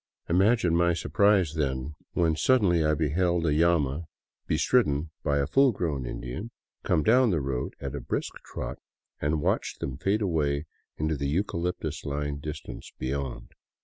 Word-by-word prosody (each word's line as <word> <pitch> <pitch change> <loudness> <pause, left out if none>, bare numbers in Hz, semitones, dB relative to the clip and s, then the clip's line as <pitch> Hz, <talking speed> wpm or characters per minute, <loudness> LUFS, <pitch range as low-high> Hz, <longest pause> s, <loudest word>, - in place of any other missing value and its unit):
Imagine 95 0 +3
my 85 0 +3
surprise, 100 -3 +3
then, 70 -2 -2 0.2
when 80 -2 +2
suddenly 90 -5 +3
I 75 0 +3
beheld 85 +3 +1
a 80 - +2
llama 80 -1 +2 0.4
bestridden 80 - +2
by 70 -1 +1
a 70 - +2
full 135 - +4
grown 75 - -2
Indian 65 - -5 0.3
come 80 - +1
down 125 - +5
the 85 -6 +1
road 65 -2 -3
at - - -5
a - - -4
brisk - - -3 0.2
trot, - - -5 0.4
and 75 0 0
watched - - 0
them 65 -1 -4
fade 100 +6 +1
away 75 -5 0 0.3
in 75 - -1
the 70 -3 -1
eucalyptus 85 -2 -2
lined 70 0 -3
distance 75 0 -7
beyond. 70 -1 -4
80 Hz, 150 wpm, -27 LUFS, 70-90 Hz, 0.4 s, down